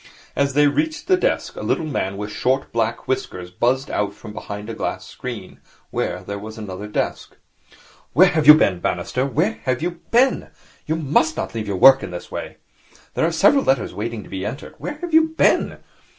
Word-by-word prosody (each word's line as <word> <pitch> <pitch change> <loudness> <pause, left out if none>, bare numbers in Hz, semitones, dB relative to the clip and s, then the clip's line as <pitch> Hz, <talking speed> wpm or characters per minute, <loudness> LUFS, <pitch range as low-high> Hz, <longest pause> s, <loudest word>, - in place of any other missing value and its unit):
As 140 -1 0
they 145 0 +5
reached 310 - 0
the 375 - +4
desk, 365 - -1
a - - -6
little 160 - 0
man 100 -10 -2
with 105 +1 -5
short, 130 +4 0
black 115 0 -1
whiskers 90 -8 -3
buzzed 130 +8 0
out 100 -1 -1
from 105 0 -10
behind 105 0 -7
a 115 - -5
glass - - -4
screen, - - -8 0.3
where - - -2
there 100 0 -5
was 110 +2 -9
another 105 -1 -6
desk. 105 - -3 0.8
'Where 180 +7 +6
have 155 -4 0
you 150 - +12
been, 95 - +2
Bannister, 130 +8 -1
where 165 - 0
have 130 +2 0
you 175 -1 -3
been? 255 +3 +3 0.4
You 160 - 0
must 155 0 +1
not - - -3
leave 110 -2 -4
your 100 -2 -2
work 135 +6 +8
in - - -5
this 90 -1 -8
way. - - -6 0.6
There 160 - +1
are - - 0
several 205 - +4
letters 130 -5 +1
waiting 110 +2 -4
to - - -14
be 95 -1 -5
entered. 115 +8 -6
Where 295 - -5
have 350 -2 -5
you 320 0 +6
been?' - - +3
130 Hz, 200 wpm, -21 LUFS, 105-160 Hz, 0.8 s, you